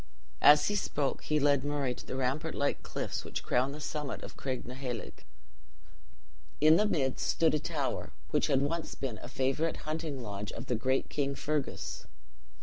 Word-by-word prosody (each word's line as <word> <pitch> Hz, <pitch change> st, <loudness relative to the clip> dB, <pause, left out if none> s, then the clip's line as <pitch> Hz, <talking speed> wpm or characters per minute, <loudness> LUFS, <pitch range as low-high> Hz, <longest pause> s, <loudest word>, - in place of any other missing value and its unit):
As 150 Hz, 0 st, +8 dB
he 205 Hz, -, +1 dB
spoke, 145 Hz, -8 st, 0 dB
he 155 Hz, 0 st, +2 dB
led 140 Hz, -2 st, +4 dB
Murray 145 Hz, -3 st, 0 dB
to -, -, -9 dB
the -, -, -4 dB
rampart 135 Hz, +5 st, -1 dB
like 145 Hz, 0 st, 0 dB
cliffs -, -, -3 dB
which -, -, -4 dB
crown 130 Hz, +3 st, +2 dB
the 150 Hz, -, -7 dB
summit 150 Hz, -2 st, -4 dB
of -, -, -8 dB
Craignacoheilg. 125 Hz, -2 st, -5 dB, 1.4 s
In 155 Hz, +2 st, +7 dB
the 210 Hz, -, +4 dB
midst 135 Hz, -9 st, 0 dB
stood 160 Hz, -2 st, +3 dB
a 150 Hz, -, +2 dB
tower, -, -, -2 dB, 0.2 s
which -, -, +2 dB
had 135 Hz, 0 st, +3 dB
once 165 Hz, +3 st, -2 dB
been 125 Hz, -6 st, -4 dB
a -, -, -7 dB
favorite 135 Hz, +5 st, 0 dB
hunting 155 Hz, -4 st, -3 dB
lodge 100 Hz, -1 st, -4 dB
of 115 Hz, -, -6 dB
the 125 Hz, -, 0 dB
great 130 Hz, +4 st, +1 dB
King 140 Hz, -1 st, -1 dB
Fergus. 150 Hz, 0 st, -3 dB
140 Hz, 170 wpm, -31 LUFS, 130-150 Hz, 1.4 s, As